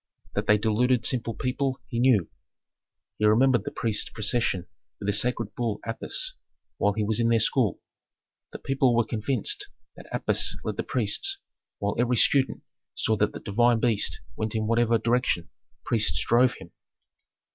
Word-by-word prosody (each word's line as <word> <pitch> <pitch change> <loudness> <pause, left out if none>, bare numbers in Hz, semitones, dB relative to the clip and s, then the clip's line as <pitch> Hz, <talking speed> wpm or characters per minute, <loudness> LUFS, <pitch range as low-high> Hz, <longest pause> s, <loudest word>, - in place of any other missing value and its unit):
That - - -2
they 105 - +5
deluded 115 +3 +1
simple 115 -3 0
people, 130 +1 -2
he 115 - -3
knew. 120 -9 +3 0.9
He 105 - +2
remembered 120 +1 +4
the - - -4
priests' 110 -3 0
procession 110 -4 -1 0.3
with - - -7
the 105 - +2
sacred 115 0 -1
bull 115 -4 -2
Apis, - - -1 0.4
while 100 - +1
he 110 +1 -1
was 110 +2 0
in 115 0 +2
their 115 -1 +3
school. 110 -2 +1 0.7
The - - -7
people 135 -2 +1
were 120 -1 +2
convinced 140 - -1 0.3
that - - -13
Apis - - +1
led - - -4
the - - 0
priests, 390 0 +1 0.4
while 100 0 -2
every 120 0 +2
student 135 +3 +3 0.3
saw 110 - +1
that 105 +1 +1
the - - -7
divine 120 +3 +2
beast 110 -3 0
went 110 0 -3
in 110 -1 -1
whatever 115 +1 +2
direction 115 -7 0 0.3
priests 110 -2 +1
drove 125 +2 +3
him. - - -13
115 Hz, 160 wpm, -26 LUFS, 105-125 Hz, 0.9 s, they